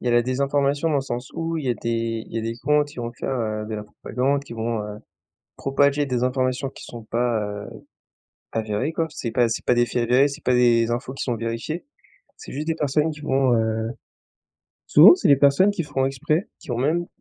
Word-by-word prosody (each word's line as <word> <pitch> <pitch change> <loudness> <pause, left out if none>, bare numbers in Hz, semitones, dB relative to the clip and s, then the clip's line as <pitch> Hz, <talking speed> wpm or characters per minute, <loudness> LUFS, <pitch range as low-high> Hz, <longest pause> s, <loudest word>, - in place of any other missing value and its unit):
Il - - -7
y - - +3
a - - +2
la 120 0 +4
désinformation 140 +4 0
dans 150 - +1
le - - +2
sens 125 -1 -5
où 165 0 -2
il 150 - -4
y - - +2
a - - +1
des 115 -1 -2
il - - -17
y - - 0
a 110 - -3
des 115 +1 -3
comptes 150 +1 +2
qui 145 - -15
vont 120 -1 -4
faire 110 -5 -2
de 110 - -5
la 105 0 -5
propagande 130 +6 -2
qui 120 - -10
vont, 115 -1 -2
heu, 105 0 -7 0.6
propager 140 +1 +2
des 125 -2 -1
informations 130 +1 0
qui - - -12
sont 120 -2 -9
pas, 115 -1 0
heu, 105 0 -6 0.8
avérées 110 +7 -1
quoi. 165 0 0
C'est 120 -6 -4
pas 120 -1 +2
c'est 115 - -3
pas 125 - +3
des 120 0 +3
faits 120 0 -1
réels, 135 +3 +5
c'est 140 - -9
pas 125 - +3
des 120 -1 +4
infos 120 +2 -3
qui - - -5
sont 120 -3 -1
vérifiées. 115 +9 -4 0.5
C'est - - -11
juste 150 +4 -4
des 165 - +1
personnes 150 +2 +1
qui 150 -1 -9
vont, 135 -3 +2
heu 110 0 -1 1.0
souvent, - - +9
c'est 365 - 0
les 140 - +7
personnes 140 +9 +4
qui 195 -4 -2
font 135 -3 -1
exprès, 155 - -1
qui - - -16
vont 120 -1 -2
même 165 +6 +1
125 Hz, 235 wpm, -23 LUFS, 115-140 Hz, 1.0 s, souvent